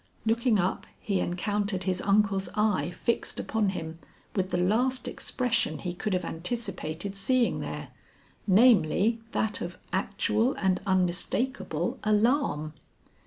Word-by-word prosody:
Looking 230 0 +2
up 185 0 -1
he 200 -3 -1
encountered 200 +2 -1
his 185 0 -1
uncle's 200 -1 +2
eye 210 -4 +1
fixed 235 +6 -2
upon 220 -3 0
him 160 -3 -5 0.4
with 190 -2 0
the 175 - 0
last 240 +8 +1
expression 245 -2 -1
he 180 -2 -4
could 195 +3 -3
have 180 -2 0
anticipated 185 -1 -3
seeing 240 +5 +2
there, - - -5 0.6
namely 220 0 +4
that 215 -2 0
of 175 +1 -5 0.2
actual 210 +6 +1
and 190 -2 +1
unmistakable 185 - 0
alarm. 215 - +1
200 Hz, 120 wpm, -28 LUFS, 180-225 Hz, 0.6 s, namely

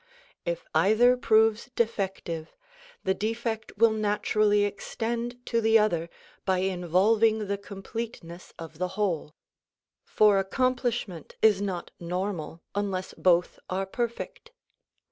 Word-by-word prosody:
If - - -3
either 235 +5 +5
proves 220 0 +3
defective, 190 -7 -2 0.5
the 190 - +2
defect 220 +2 -3
will 230 +1 +5
naturally 210 -1 +2
extend 235 +4 -3
to 230 -1 +1
the 225 0 +5
other 170 -6 +1 0.3
by 190 -1 +1
involving 195 +5 +2
the 200 0 -2
completeness 200 -3 -7
of 165 -1 -10
the 185 - 0
whole; 170 -7 -1 0.7
for 210 -2 +4
accomplishment 235 - -1
is 210 -3 +5
not 185 -4 -3
normal 175 -2 -4
unless 195 -2 -2
both 175 -1 +2
are 190 +1 -1
perfect. 235 - -4
205 Hz, 110 wpm, -27 LUFS, 185-225 Hz, 0.7 s, either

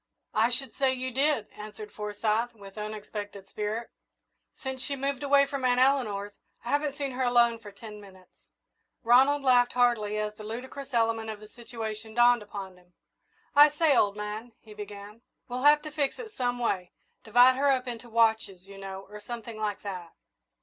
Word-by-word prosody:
"I 220 +2 +3
should 250 0 -2
say 270 -2 +2
you 255 0 -3
did," 270 -3 +1
answered 210 0 -9
Forsyth, 215 +3 -1
with 195 -2 -13
unexpected 210 -2 -6
spirit. 215 +3 -4 0.7
"Since 265 -1 -5
she 280 +1 -2
moved 275 -1 -2
away 280 0 +4
from 275 -1 -5
Aunt 250 0 +3
Eleanor's, 215 -7 +1 0.3
I - - -5
haven't 290 -1 0
seen 280 -2 -2
her 255 +1 -4
alone 240 -2 +3
for 210 -3 -11
ten 210 +1 -10
minutes." 190 -2 -16 0.7
Ronald 265 +4 +5
laughed 245 -2 +4
heartily 235 -4 +2
as 210 0 -2
the 215 - -11
ludicrous 260 +4 -7
element 225 -1 +1
of 215 -1 -6
the 215 0 -13
situation 225 -2 -7
dawned 240 -1 +5
upon 200 -3 -8
him. 180 0 -25 0.6
"I 295 +1 +9
say, 295 -1 +3
old 205 -4 +3
man," 210 +3 -6
he 215 - -13
began, 210 +1 -9 0.3
"we'll 250 +1 -4
have 295 +2 +6
to 305 - -7
fix 290 -2 -1
it 455 -3 -8
some 245 -1 -1
way 190 -7 -2 0.3
divide 245 +3 +6
her 280 +1 +3
up 260 -1 +1
into 240 0 -6
watches, 220 -5 +1
you 195 0 -11
know, 195 0 -7
or 210 +1 -10
something 230 0 -7
like 210 -2 -3
that." 180 -4 -6
230 Hz, 180 wpm, -28 LUFS, 210-260 Hz, 0.7 s, I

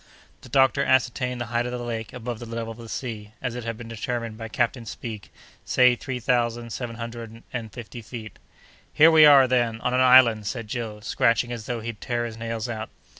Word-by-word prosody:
The 130 - -13
doctor 135 +2 +3
ascertained 125 -1 +1
the 120 - -2
height 120 +1 +1
of - - -4
the 125 - -3
lake 115 -2 -5
above 120 -2 -6
the 120 - -8
level 115 0 -4
of 115 - -11
the 115 -1 -10
sea, 110 -4 -6
as 125 -2 -3
it 125 0 -5
had 115 -1 -4
been 115 -1 -9
determined 115 0 -4
by 115 0 -7
Captain 120 +2 -1
Speke, 110 -1 -7 0.3
say 125 -1 +4
three 125 0 -5
thousand 120 -1 0
seven 120 -2 -5
hundred 115 -1 -8
and 115 -3 -4
fifty 120 +1 -9
feet. 110 -2 -9 0.5
"Here 160 +2 +6
we 155 -1 +8
are, 140 -3 +8
then, 120 -3 +1
on 125 - 0
an 125 - +2
island!" 125 -5 +6
said 115 0 -4
Joe, 110 -2 -5
scratching 115 +2 +1
as 115 -3 -6
though 120 -2 -3
he'd 115 -1 -6
tear 120 -1 -1
his 115 -2 -6
nails 115 -1 -4
out. 110 -2 -5
120 Hz, 215 wpm, -25 LUFS, 115-125 Hz, 0.5 s, we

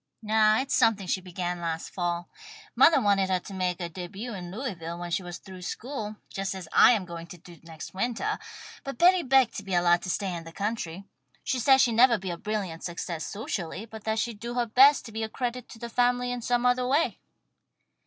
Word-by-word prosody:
"No, 215 0 +4
it's 265 +4 -1
something 225 -5 +3
she 185 +1 -1
began 180 -1 -4
last 165 -1 -3
fall. 175 -1 -2 0.5
Mothah 320 -3 +6
wanted 200 -3 +2
her 185 -1 +2
to 200 - -10
make 185 -1 -1
her 175 - -3
début 190 +7 -7
in 175 -2 -7
Louisville 180 -7 -5
when 175 0 -6
she 180 - 0
was 175 -1 -7
through 185 -1 -12
school, 215 +2 -5
just 195 0 -4
as 185 -3 -7
I - - +8
am 205 -5 -1
going 170 -1 -8
to 180 - -10
do 175 0 -15
next 160 -1 -10
wintah, 240 - -1 0.4
but 275 -3 -6
Betty 360 +3 +6
begged 265 -4 +4
to 205 - -5
be 190 -2 -2
allowed 175 0 +4
to 185 - -6
stay 190 0 -1
in 170 -1 -5
the 165 - -10
country. 195 -2 -3 0.4
She 255 - -1
said 265 +3 +6
she'd 235 - +4
nevah 240 -1 +6
be 190 -2 -5
a 170 - -4
brilliant 195 -5 -4
success 170 -2 -4
socially, 200 -2 -4
but 220 -1 -11
that 220 0 0
she'd 225 -2 -2
do 235 +2 -5
her 245 -1 +1
best 265 +5 +6
to 225 - -9
be 220 +1 -4
a 220 - -2
credit 245 +1 -4
to - - -11
the 235 +1 -6
family 245 +1 +1
in 245 -1 -3
some 245 +1 0
other 250 0 +3
way." 290 +6 +1
205 Hz, 225 wpm, -27 LUFS, 175-240 Hz, 0.5 s, I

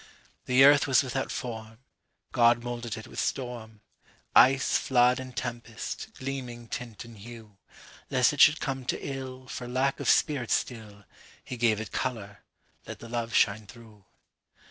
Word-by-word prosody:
(The 130 +1 +5
earth 145 0 +6
was 135 0 +4
without 130 +1 -3
form; 110 -2 -6 0.5
God 120 -1 +4
moulded 120 -2 -5
it 110 - -8
with - - -8
storm, 115 -5 -4 0.5
Ice, 130 +1 +5
flood, 125 0 +3
and 130 -1 -9
tempest, 120 - -6
gleaming 125 -3 -6
tint 120 -3 -6
and 115 -1 -13
hue; 110 -2 -12 0.5
Lest 125 +2 +3
it 145 - 0
should 150 +1 +7
come 135 -1 -3
to - - -2
illFor 130 -2 -7
lack 135 +2 0
of - - -1
spirit 135 -7 +2
still, 105 -4 -3 0.4
He 130 - -6
gave 115 -3 +2
it 110 - -6
colour,—let 105 -5 -7
the 115 - -11
love 120 0 -3
shine 105 +1 +2
through.) 110 -1 -15
120 Hz, 145 wpm, -28 LUFS, 110-130 Hz, 0.5 s, should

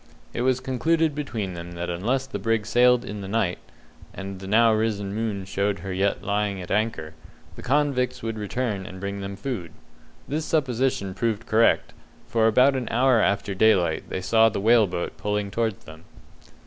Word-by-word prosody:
It - - -2
was 130 0 +2
concluded 155 +5 +1
between 115 -10 -4
them 85 0 -8
that 85 0 -4
unless 120 +10 -1
the 130 -6 -6
brig 115 +1 0
sailed 125 +1 +4
in 105 0 -6
the 95 - -6
night 100 -3 0 0.6
and 95 0 -6
the 95 - -8
now 110 +2 +5
risen 105 -3 -1
moon 105 -3 -3
showed 100 +1 -1
her 95 - -3
yet 100 +2 0
lying 100 -1 -1
at 90 - -7
anchor 100 -7 -1 0.4
the - - -10
convicts 125 -2 0
would 115 -1 -3
return 105 -2 -3
and 95 - -9
bring 100 +1 -4
them 100 0 -5
food. 100 - -5 0.6
This 155 +3 -2
supposition 130 - 0
proved 115 +2 -2
correct, 115 +1 +2 0.3
for 110 -1 +2
about 130 +5 +4
an 125 -3 -2
hour 125 -1 +3
after 100 0 0
daylight 95 -5 +2
they 95 - -3
saw 115 +4 +4
the 110 - -3
whale 110 +1 +5
boat 90 -1 -4
pulling 105 -1 -2
towards 110 -1 -2
them. 80 +1 -12
110 Hz, 180 wpm, -24 LUFS, 95-125 Hz, 0.6 s, now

